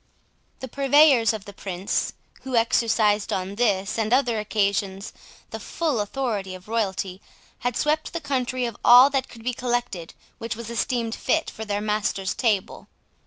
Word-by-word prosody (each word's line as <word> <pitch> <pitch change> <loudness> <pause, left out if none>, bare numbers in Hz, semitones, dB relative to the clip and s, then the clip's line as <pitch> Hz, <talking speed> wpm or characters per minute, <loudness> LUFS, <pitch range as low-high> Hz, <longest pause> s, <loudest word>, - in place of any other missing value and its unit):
The 260 - -5
purveyors 275 -2 +4
of 215 -3 -6
the 200 - -10
Prince, 190 -1 -3 0.3
who 260 -2 -4
exercised 225 -2 +2
on 190 +1 -2
this 205 -2 0
and 220 0 -1
other 245 -3 +2
occasions 200 -1 -1 0.4
the - - -5
full 310 -8 -2
authority 205 -4 -3
of 185 +1 -13
royalty, 195 -4 -2 0.4
had 245 -1 -2
swept 305 +1 0
the 335 - -3
country 255 -4 -1
of 235 -3 -5
all 250 +3 +8
that 270 -2 -1
could 230 -2 -13
be 250 +1 -1
collected 240 -9 -3 0.2
which 230 0 -4
was 230 0 -7
esteemed 235 -1 -1
fit 320 +6 0
for 220 - -7
their 205 -1 -2
master's 210 -2 -1
table. 210 -6 -1
225 Hz, 160 wpm, -24 LUFS, 200-250 Hz, 0.4 s, all